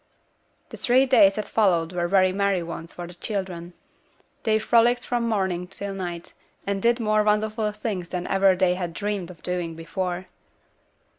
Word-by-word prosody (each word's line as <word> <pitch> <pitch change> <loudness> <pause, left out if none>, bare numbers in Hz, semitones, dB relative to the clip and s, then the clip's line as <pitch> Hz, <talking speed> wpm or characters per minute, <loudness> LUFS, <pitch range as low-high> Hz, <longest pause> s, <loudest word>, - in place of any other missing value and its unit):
The - - -9
three 255 +2 +4
days 200 -7 +5
that 215 - -3
followed 180 -6 +2
were 175 -1 0
very 185 0 +4
merry 195 -2 +1
ones 165 0 -7
for 175 - -7
the 175 - -10
children. 180 -2 -5 0.7
They 220 -1 +2
frolicked 235 +2 +3
from 240 -1 -1
morning 190 -4 -1
till 195 +1 -6
night, 175 -3 -6 0.3
and 200 -1 -2
did 235 +2 +3
more 215 -1 +2
wonderful 215 +1 +1
things 210 -5 -4
than 180 -1 -3
ever 195 -1 +3
they 185 -1 +2
had 175 -2 -4
dreamed 205 -4 -3
of 175 -3 -13
doing 175 -2 -3
before. 175 +2 -4
190 Hz, 165 wpm, -24 LUFS, 175-215 Hz, 0.7 s, days